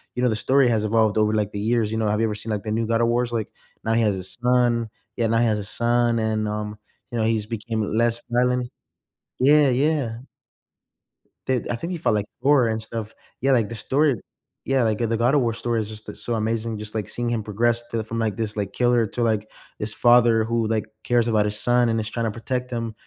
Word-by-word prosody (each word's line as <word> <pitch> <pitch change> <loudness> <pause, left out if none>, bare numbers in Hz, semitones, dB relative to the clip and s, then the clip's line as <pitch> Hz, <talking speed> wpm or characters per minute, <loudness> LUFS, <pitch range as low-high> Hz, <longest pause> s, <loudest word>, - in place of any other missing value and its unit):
you 125 - -1
know, 125 - +4
the 110 - 0
story 130 +4 +3
has 110 -2 +1
evolved 110 -1 +2
over, 105 0 +3
like, 105 -1 0
the 100 - -3
years. 110 0 +1
You 110 - -1
know, 110 -1 0
have 105 +1 +1
you - - +3
ever 105 - -3
seen, 110 +1 -6
like, 105 0 -2
the 105 - -4
new 115 0 0
God 115 0 +1
of 115 - +3
Wars? 120 0 +1
Like, 110 -3 -2 0.4
now 110 - +1
he 115 - +3
has 105 -4 +1
a - - -6
son 120 +2 +1 0.3
yeah, 115 -1 +1
now 115 +1 +2
he 120 - +3
has 105 -2 +1
a - - -4
son, 120 +2 +1
and, 110 -1 0
um, 105 0 -4 0.3
you 120 - -3
know, 110 - +1
he's 110 -2 0
became 110 0 -3
less 115 0 +1
violent. 125 0 +1 0.7
Yeah, 145 +1 +5
yeah. 130 -3 0 1.3
The 130 -2 0
I - - 0
think 165 +10 -5
he 175 - -2
fought, 155 - +1
like, 105 -1 0 0.2
Thor 140 -4 +5
and 110 0 -1
stuff. 110 -1 -6 0.3
Yeah, 135 - +2
like, 115 -5 +2
the 115 - -5
stor 140 +4 +1 0.5
yeah, 135 -2 +1
like, 110 0 0
uh, 115 - +1
the 115 0 0
God 120 +3 +2
of 145 - +4
War 115 -1 0
story 115 0 -1
is 105 - -6
just 110 0 -9
a - - -6
so 120 - -3
amazing. 110 0 -1
Just, 105 0 -8
like, 110 -3 -3
seeing 120 0 -2
him 115 -2 -1
progress 120 +3 0
to 115 -1 -2
from, 115 +1 -5
like, 110 -1 -1
this, 110 -2 -3
like, 100 -2 -3
killer 120 -2 +2
to, 120 +4 -3
like, 110 -2 0 0.3
this 105 +1 -3
father 120 -2 +5
who, 115 0 0
like, 110 -1 0 0.2
cares 120 -1 +2
about 105 -2 +2
his 105 0 -2
son 120 0 +3
and 115 0 +1
is 110 0 -3
trying 115 0 -2
to 110 - 0
protect 125 +3 -3
him. 115 -2 -3
115 Hz, 250 wpm, -23 LUFS, 110-120 Hz, 1.3 s, Yeah